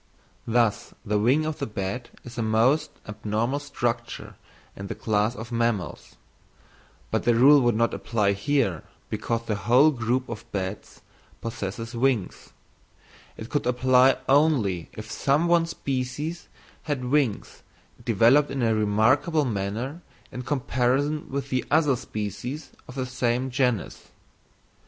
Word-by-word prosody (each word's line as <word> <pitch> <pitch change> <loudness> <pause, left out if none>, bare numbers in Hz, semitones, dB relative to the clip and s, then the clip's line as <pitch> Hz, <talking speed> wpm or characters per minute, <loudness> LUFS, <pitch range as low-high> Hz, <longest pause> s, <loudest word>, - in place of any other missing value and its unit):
Thus, 115 0 +1
the 105 -1 +1
wing 130 +9 +3
of 155 -1 -3
the - - -2
bat 105 +4 -4
is 120 -1 -10
a 120 - -2
most 115 +7 +2 0.2
abnormal 110 +5 -2
structure 120 -5 -3 0.4
in 100 - -7
the - - -5
class 110 +2 0
of 115 +1 -8
mammals; 115 -5 -2 1.0
but - - +1
the 120 - +2
rule 140 +4 +7
would 120 -2 +2
not 115 +1 +1
apply 105 -4 0
here, 100 - 0 0.3
because 115 0 -2
the 110 - -1
whole 120 +9 +4
group 125 0 -1
of 115 0 -8
bats 95 0 -5 0.4
possesses 115 0 -5
wings; 120 -4 -1 0.9
it 110 - -9
would 145 -4 0
apply 130 +1 +4
only 130 - +2
if - - -8
some 145 +5 +1
one 170 -1 +3
species 140 +3 -4 0.3
had 145 -5 -3
wings 130 -5 0 0.4
developed 120 +7 +4
in 135 -2 -2
a 115 -1 +3
remarkable 110 - +2
manner 115 - -3 0.3
in 125 - -5
comparison 135 +2 0
with 140 0 -4
the 130 -1 +1
other 150 -3 +3
species 120 - -5 0.2
of 125 - -10
the 130 -2 -2
same 125 +1 -1
genus. 125 - -1
120 Hz, 135 wpm, -25 LUFS, 110-135 Hz, 1.0 s, rule